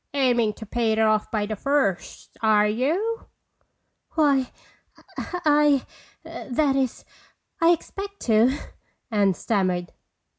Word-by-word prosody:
"Aiming 240 -5 +2
to 220 - -10
pay 225 +1 0
it - - -2
off 215 -1 +2
by 210 -2 -1
the 215 +1 -4
first, 275 -5 -1
are 215 -2 +4
you?" 325 - -1 0.9
"Why,—I—that 290 -1 -1
is, 265 -3 -1 0.6
I 330 - +5
expect 395 +4 -2
to," 225 +2 +4 0.6
Anne 200 -3 +2
stammered. 185 -5 -1
245 Hz, 100 wpm, -24 LUFS, 215-295 Hz, 0.9 s, I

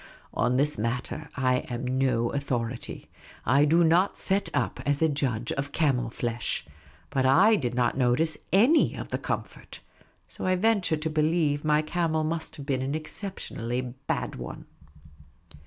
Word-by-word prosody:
On 125 +1 +1
this 150 0 +1
matter 125 +7 -3
I 130 -1 +2
am 120 +1 -4
no 120 -3 +1
authority. 125 -4 -3 0.4
I 140 +5 +4
do 165 +3 +4
not 170 +4 +3
set 195 +1 0
up - - -1
as 145 0 +1
a 160 - +4
judge 130 -6 -1
of 140 +1 -3
camel 130 -7 +1
flesh. 120 0 -3 0.5
But 130 -1 +2
I 195 +11 +6
did 125 - -2
not 125 -1 +1
notice 135 +6 +2 0.2
any 235 - +4
of - - -6
the - - -2
comfort; - - -5 0.5
so - - -5
T 185 - +3
venture 195 -4 +2
to 155 +1 -2
believe 155 -1 +1
my 150 0 +3
camel 160 -1 0
must 160 +1 -3
have 140 - -8
been 135 -3 0
an 135 +3 -2
exceptionally 155 - -4 0.3
bad - - -2
one. - - -7
145 Hz, 155 wpm, -27 LUFS, 125-160 Hz, 0.5 s, I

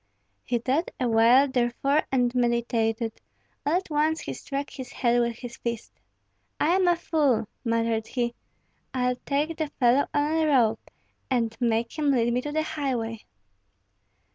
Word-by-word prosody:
He 245 - 0
thought 265 +8 0
awhile, 240 +2 +5
therefore, 260 +3 +1
and 245 -2 +2
meditated; 235 -2 0 0.4
all 295 - 0
at 365 -2 -2
once 310 +2 +1
he - - -5
struck 280 0 -5
his 260 -2 -8
head 240 -2 +2
with 235 -1 -1
his 240 -1 -8
fist, 235 -1 -5 0.7
"I - - +2
am 375 -1 +3
a 350 - +5
fool!" 290 -10 +1 0.2
muttered 230 -2 0
he. 240 -2 -1 0.6
"I'll 250 -1 +1
take 300 +3 0
the 315 - -1
fellow 265 -1 +2
on 295 +1 +1
a 320 -1 +2
rope, 235 -6 +2 0.4
and 230 -4 0
make 230 +4 0
him 295 -1 +2
lead 240 -3 +2
me 250 - +1
to 295 - -5
the 310 +1 0
highway." 250 -8 -3
250 Hz, 155 wpm, -26 LUFS, 235-290 Hz, 0.7 s, awhile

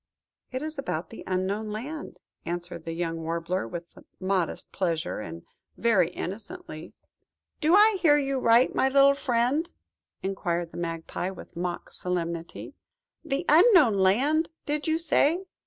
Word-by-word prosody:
"It 255 +2 -3
is 310 -1 -5
about 165 -11 -3
the 225 - -9
Unknown 190 +4 -1
Land," 275 +9 -6 0.2
answered 175 -1 -4
the 165 - -4
young 165 -1 -3
Warbler, 165 -1 -2
with 170 +7 -8 0.2
modest 185 -2 -1
pleasure, 170 -3 -1
and 85 -4 -8 0.3
very 200 -8 +3
innocently. 230 - -7 0.7
"Do 325 +3 +4
I 420 0 +6
hear 295 -3 +6
you 275 -2 0
right, 235 +1 +4
my 265 - +2
little 275 +1 +6
friend?" 265 +5 0 0.5
inquired 175 -3 -2
the - - -10
Magpie 165 +1 -3
with 190 - -11
mock 175 0 -4
solemnity–"The 180 - -5
Unknown 335 - +6
Land, 255 - +2 0.2
did 295 +1 -2
you 315 0 +2
say? 330 +1 +2
210 Hz, 135 wpm, -27 LUFS, -, 0.7 s, I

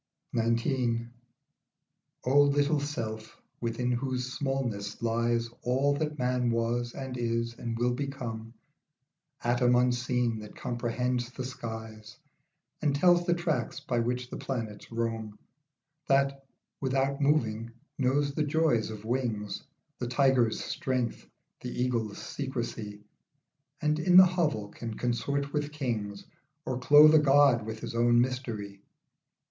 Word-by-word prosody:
22 115 +1 +1
XIX. 115 0 -5 1.2
O 135 +3 +5
LITTLE 145 +1 +2
self, 115 -7 -5 0.2
within 120 +1 -1
whose 130 0 -2
smallness 120 -7 -2
lies 115 0 +1
All 135 +3 +2
that 150 +1 -2
man 125 -1 +1
was, 120 +1 -1
and 130 -2 -5
is, 115 0 -1
and 115 -1 -5
will 120 +1 +1
become, 120 -4 -5 0.9
Atom 125 +1 +3
unseen 125 -2 +1
that 105 -1 -10
comprehends 120 +1 -2
the 130 0 -6
skies 110 -3 -7 0.6
And 145 -3 +2
tells 175 +3 +4
the 175 - +3
tracks 170 -5 -1
by 130 -5 -1
which 125 +1 -2
the - - -4
planets 115 -6 -5
roam; 115 -2 -3 0.7
That, 135 0 +1 0.3
without 135 +1 0
moving, 115 -6 +1 0.3
knows 140 +2 +1
the 155 - -1
joys 150 -7 +2
of 110 -1 -8
wings, 115 -4 -2 0.4
The 120 - -2
tiger's 125 -3 +2
strength, 130 -7 -2 0.3
the 125 0 -6
eagle's 115 -5 -1
secrecy, 115 -6 -5 0.8
And 150 0 +1
in 180 +2 +5
the 185 - +11
hovel 155 - 0
can 115 +1 -6
consort 140 +4 -1
with 150 -1 -1
kings, 110 -9 -3 0.4
Or 130 -1 -2
clothe 150 +4 +8
a 155 - +8
God 140 -5 +5
with 110 0 -6
his - - -5
own 120 0 +4
mystery. 115 -6 -2
125 Hz, 130 wpm, -29 LUFS, 115-140 Hz, 1.2 s, the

